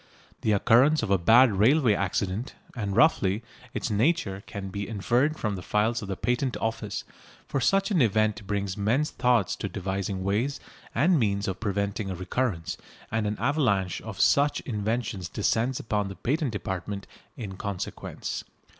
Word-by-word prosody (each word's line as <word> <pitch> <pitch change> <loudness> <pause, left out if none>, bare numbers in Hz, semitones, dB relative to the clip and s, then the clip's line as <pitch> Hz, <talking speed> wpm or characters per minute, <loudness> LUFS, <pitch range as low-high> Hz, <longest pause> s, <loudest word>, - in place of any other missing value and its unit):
The 110 - +2
occurrence 125 +9 +4
of - - -2
a 100 - +4
bad 115 +7 +6
railway 115 +5 +4
accident, 95 +4 -2 0.2
and, 100 -5 -2
roughly, 110 -6 +3 0.3
its - - -3
nature, 105 - +1
can 100 -1 -6
be 100 +1 -4
inferred 120 +8 +1
from 105 -3 -1
the 90 - -6
files 110 +5 +1
of 100 - -6
the 95 - -2
Patent 125 +1 0
Office, 110 -2 -3 0.4
for 135 - -1
such 195 - +2
an 180 -6 +3
event 110 -2 +1
brings 100 -2 -1
men's 120 +9 +1
thoughts 120 -6 +2
to - - -3
devising 95 0 -3
ways 110 +9 0 0.4
and 160 +6 +4
means 100 -3 0
of 95 -1 -3
preventing 100 -1 -2
a 95 - -3
recurrence, 90 -1 -2 0.3
and 110 -1 0
an 105 0 -2
avalanche 110 - +1
of - - -8
such 145 +1 +4
inventions 105 -4 -2
descends 115 +4 0
upon 105 -2 -1
the 95 - -7
patent 140 - 0
department 100 -1 -4 0.3
in 105 -6 -6
consequence. 100 -1 -5
105 Hz, 160 wpm, -27 LUFS, 100-125 Hz, 0.4 s, bad